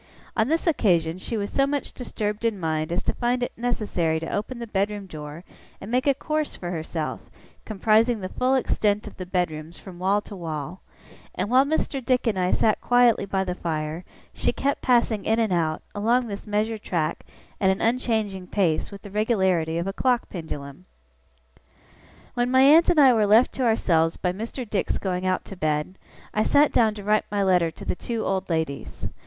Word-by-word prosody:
On 220 0 +2
this 325 +3 0
occasion 180 - +2
she 225 +4 -3
was 205 -1 -3
so 275 0 +2
much 285 0 -2
disturbed 210 -3 -4
in 225 -4 0
mind 155 -1 -1
as 175 - -1
to - - -1
find 245 0 0
it - - -2
necessary 205 -9 -1
to 165 - -5
open 215 +5 -3
the 235 - -5
bedroom 205 -1 -2
door, 155 -1 -8 0.4
and 200 - -8
make 255 +3 +1
a 280 - +4
course 305 +2 -2
for 175 -1 -5
herself, 160 -2 -3 0.5
comprising 220 +2 +2
the 185 - -4
full 255 +5 +1
extent 210 -5 +1
of 210 - -10
the 185 -1 -6
bedrooms 170 -3 -2
from 180 -3 -11
wall 195 +3 +2
to 205 - -10
wall; 165 0 -5 0.5
and 190 +5 -2
while 260 +2 +6
Mr. 280 -2 -1
Dick 255 0 +1
and 210 -5 +1
I 180 0 +1
sat 215 +2 +2
quietly 245 -4 +4
by 190 -1 -1
the 180 -1 -3
fire, 160 -1 -3 0.3
she - - 0
kept 280 +1 -1
passing 235 -4 +2
in 225 - +1
and 220 -5 +1
out, 160 -2 0
along 235 +5 +2
this 205 -1 -7
measured 215 +1 -1
track, 165 -5 -2 0.4
at 190 - +3
an 190 - +1
unchanging 220 -6 0
pace, 180 -6 0
with 200 -1 -11
the 205 - -10
regularity 190 -7 +1
of 170 - -1
a 195 - -3
clock 250 +2 +1
pendulum. 150 -2 -7 1.5
When 245 0 0
my 260 +1 +5
aunt 315 +6 +7
and 345 -3 +4
I 270 -3 +7
were 215 -3 +2
left 220 +5 +5
to 260 - -1
ourselves 165 -8 +2
by 180 -1 -1
Mr. 230 +5 -6
Dick's 205 -2 -1
going 185 -1 -2
out 185 0 0
to 195 - -9
bed, 155 +2 -2 0.3
I 215 - +1
sat 285 +6 +4
down 220 -3 +3
to 205 - -8
write 210 +1 +2
my 205 -1 0
letter 180 -3 +3
to - - -11
the - - -1
two 230 +4 -4
old 190 -1 -1
ladies. 160 -4 -3
205 Hz, 200 wpm, -24 LUFS, 175-235 Hz, 1.5 s, aunt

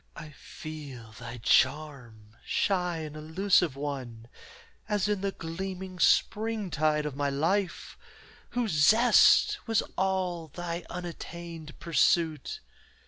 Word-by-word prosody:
I 155 -2 -9
feel 145 -6 -9
thy 120 0 -7
charm, 130 -7 +1
shy 180 -3 0
and 155 -1 -7
elusive 160 0 +1
one, 130 -5 -6 0.6
As 210 -1 +1
in 205 -2 0
the 200 0 -1
gleaming 185 +2 -6
springtide 170 -9 +2
of 150 -3 -4
my 145 0 0
life, 170 +7 -1 0.6
Whose 235 -3 +1
zest 230 - +5
was 225 -2 +2
all 185 -3 -1
thy 170 +2 -5
unattained 170 -2 -8
pursuit. 170 - +1
165 Hz, 105 wpm, -28 LUFS, 145-190 Hz, 0.6 s, zest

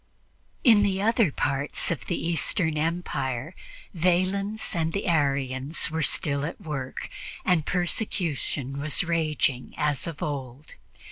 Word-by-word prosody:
In 225 -6 +7
the 195 -2 +1
other 220 -4 +3
parts 140 +4 -1
of 170 - -3
the 175 - 0
Eastern 165 0 0
empire 155 -3 -2 0.4
Valens 185 +5 +1
and 165 -1 0
the 200 - -2
Arians 140 -2 +2
were 160 +1 -1
still 140 -1 +1
at 165 - -4
work, 135 -5 -5 0.4
and 175 -5 +2
persecution 170 - -1
was 150 +3 +1
raging 155 -6 0
as 150 0 +1
of 165 -3 -5
old. 140 -1 -5
160 Hz, 125 wpm, -26 LUFS, 140-180 Hz, 0.4 s, In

